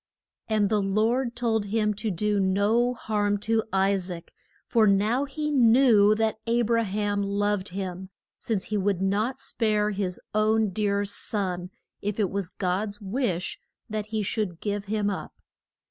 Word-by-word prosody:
And 215 -2 +2
the 215 -1 +2
Lord 225 +5 +1
told 225 -3 0
him 210 +1 +1
to 215 +2 -3
do 205 +2 0
no 205 +6 +2
harm 205 -3 0
to 225 +1 +1
I 195 +1 +3
saac, 180 -3 -6 0.4
for 225 -2 +3
now 215 +7 +2
he 300 +2 -3
knew 230 -5 +5
that 220 0 0
A 235 +1 +2
bra 230 +1 +2
ham 205 -1 -1
loved 200 0 0
him, 185 0 -5 0.3
since 210 -5 -2
he 210 - -2
would 195 -2 +1
not 205 +6 0
spare 210 -2 0
his 190 -3 -3
own 215 0 +2
dear 205 0 0
son 185 -3 -3 0.3
if 205 +1 -3
it 200 -4 +1
was 195 -3 -2
God's 200 +3 -2
wish 200 -4 -2 0.3
that 215 -1 -3
he 215 -1 -2
should 195 -4 -2
give 205 -1 -3
him 210 0 -1
up. 195 - -6
210 Hz, 160 wpm, -26 LUFS, 195-220 Hz, 0.4 s, knew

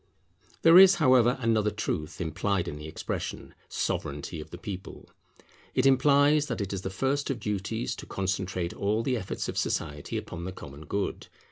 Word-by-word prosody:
There 165 +2 +9
is, 190 0 +9
however, 130 -5 +4
another 110 -2 +2
truth 95 -5 -3
implied 90 +2 -1
in 75 - -5
the 75 +1 -8
expression, 80 - -5 0.2
Sovereignity 75 +3 -3
of - - -11
the - - -8
people. 95 -2 -8 0.6
It 130 - +2
implies 145 +2 +5
that 115 - -3
it 100 -1 -3
is 95 - -3
the 95 - -3
first 135 +8 -1
of 135 -4 -2
duties 105 +3 -2
to - - -9
concentrate 95 -2 -2
all 105 +3 0
the 130 0 0
efforts 95 -5 -4
of - - -2
society 75 -2 -2
upon 85 -1 -6
the 95 - -4
common 75 -3 -10
good. 100 0 -3
100 Hz, 170 wpm, -28 LUFS, 90-130 Hz, 0.6 s, There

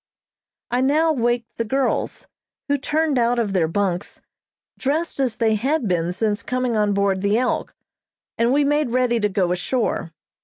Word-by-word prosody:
I 245 +1 +1
now 310 +4 +3
waked 240 -2 -1
the - - +2
girls, 265 +4 -1 0.4
who 285 - +2
turned 295 0 0
out 240 +1 +2
of 215 -4 0
their 175 -4 +2
bunks, 185 +1 -2 0.6
dressed 300 +4 -1
as 255 -5 0
they 225 -1 +2
had 260 +4 0
been 175 -2 0
since 210 +3 -1
coming 250 -1 -1
on 210 -1 +2
board 200 -1 +1
the 200 +2 +2
"Elk," 250 +1 -1 0.6
and 235 +1 +2
we 290 +2 +3
made 295 -1 +1
ready 245 -1 +1
to 210 -1 +1
go 185 -2 0
ashore. 180 -1 -1
235 Hz, 165 wpm, -22 LUFS, 205-270 Hz, 0.6 s, now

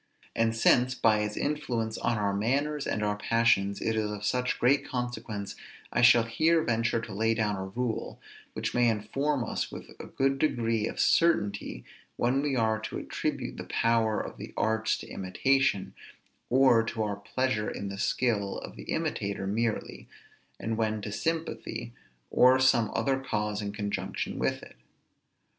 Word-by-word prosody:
And 115 0 +2
since, 125 +2 +4
by 110 -3 +3
its 105 0 -2
influence 120 -7 -1
on 115 - 0
our 100 -1 0
manners 140 +8 0
and 105 - -1
our 105 0 0
passions, 105 -3 +2
it 110 - -1
is 110 -1 0
of 105 0 -5
such 125 +3 0
great 135 +4 +3
consequence, 115 -5 -4 0.4
I - - +2
shall 120 -1 +7
here 160 +8 +2
venture 115 0 +1
to 110 - -8
lay 110 +3 +1
down 105 -2 0
a 95 0 -4
rule, 115 +4 -3 0.3
which - - -3
may 120 -1 +4
inform 125 +6 -1
us 110 - -3
with - - -9
a - - -8
good 135 0 0
degree 115 -7 +1
of - - -6
certainty 105 -13 +2 0.3
when 125 +3 +2
we 145 -2 0
are 110 -2 +1
to - - -5
attribute - - -3
the - - -5
power 115 -2 +1
of - - -6
the - - -9
arts 110 0 +1
to - - -9
imitation, 100 +2 0 0.6
or 130 -2 +5
to 115 0 -2
our 105 -1 -2
pleasure 105 +1 -1
in 100 - -5
the 100 0 -6
skill 105 -4 0
of - - -8
the - - -10
imitator 100 -1 -2
merely, 110 +3 -2 0.5
and 110 +1 -2
when 110 -2 -1
to 105 - -4
sympathy, 160 - -3 0.4
or 130 +1 +6
some 125 -4 +4
other 135 -1 +1
cause 105 -5 -2
in 100 -1 -3
conjunction, 100 0 -3
with - - -1
it. - - -14
115 Hz, 165 wpm, -29 LUFS, 105-125 Hz, 0.6 s, shall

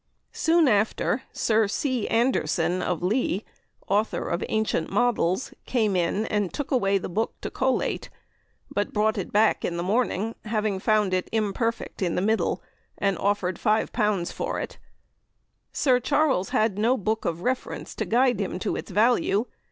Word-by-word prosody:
Soon 330 -1 +3
after 220 +3 +1
Sir 220 -1 +2
C. 250 +2 -1
Anderson, 185 -7 +1
of 180 -2 -2
Lea 205 0 0 0.4
(author 210 +3 0
of 170 - -1
Ancient 215 -7 0
Models), 240 -4 +1
came 220 -6 +1
in 180 +5 +1
and 205 -4 -1
took 290 - -5
away 200 -7 +3
the 190 - -4
book 215 +6 -2
to - - -5
collate, 260 0 -1 0.6
but 205 - -2
brought 215 0 +1
it 185 - -5
back 215 +1 +3
in 170 - -2
the 170 - -2
morning 220 +1 0
having 215 -3 -1
found 210 -2 +2
it 185 -1 0
imperfect 225 +1 -1
in 175 -3 0
the - - +1
middle, 220 +2 0 0.3
and 195 -1 +1
offered 195 -3 0
L5 210 -3 +1
for - - -3
it. - - -6 0.9
Sir 255 -3 +3
Charles 275 -7 +1
had 215 -2 +1
no 240 +5 +3
book 220 +1 -1
of 170 0 -2
reference 255 +2 -3
to - - -3
guide 245 -2 +2
him 190 - -2
to - - -2
its - - -6
value. 215 +1 +2
215 Hz, 160 wpm, -25 LUFS, 195-235 Hz, 0.9 s, Soon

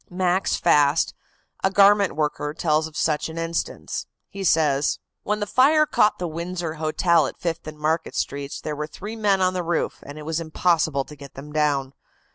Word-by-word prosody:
Max 185 +1 +1
Fast, 150 -2 +3 0.5
a 190 - +4
garment 200 0 +5
worker, 150 -1 -2
tells 155 -1 +1
of 155 - -11
such 150 0 0
an 160 - -8
instance. 165 0 -3 0.2
He 195 -1 -6
says: 150 -5 +2 0.2
"When 210 0 -1
the 205 - -1
fire 290 +8 +4
caught 210 -7 +2
the 180 - -3
Windsor 170 0 -4
Hotel 160 0 +3
at - - -9
Fifth 170 -2 -3
and 155 0 -7
Market 155 +2 -1
Streets 140 0 -3
there 150 - -4
were 150 +1 -4
three 205 +8 -8
men 205 -3 +2
on 185 0 +2
the 180 - -1
roof, 170 0 -1
and 145 +1 -10
it 150 - -8
was 160 +1 -1
impossible 160 -3 +1
to 150 - -12
get 140 -2 -13
them 150 +2 -10
down. 145 -3 0
160 Hz, 190 wpm, -23 LUFS, 150-185 Hz, 0.5 s, garment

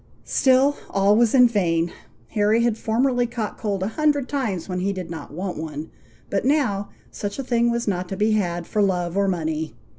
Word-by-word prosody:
Still, 270 +2 +3
all 200 +1 +3
was 235 +2 +3
in 250 -2 +8
vain! 175 -6 +1 0.4
Harry 215 - +2
had 235 -2 +2
formerly 245 +2 +1
caught 230 -3 -4
cold 200 -4 -2
a 195 - -1
hundred 290 +1 +1
times 220 - -2
when 180 -1 -3
he 195 +2 0
did 185 -3 -6
not 165 - -7
want 180 +4 -4
one; 155 -1 -6 0.4
but 200 - 0
now, 250 -8 +1 0.2
such 200 -1 -5
a 275 - -3
thing 235 -2 +2
was 235 0 -1
not 180 -2 -1
to 195 - -4
be 215 +2 +2
had 175 -5 0
for 210 - -1
love 180 -3 0
or 200 0 +2
money. 160 -5 -2
205 Hz, 200 wpm, -23 LUFS, 180-235 Hz, 0.4 s, in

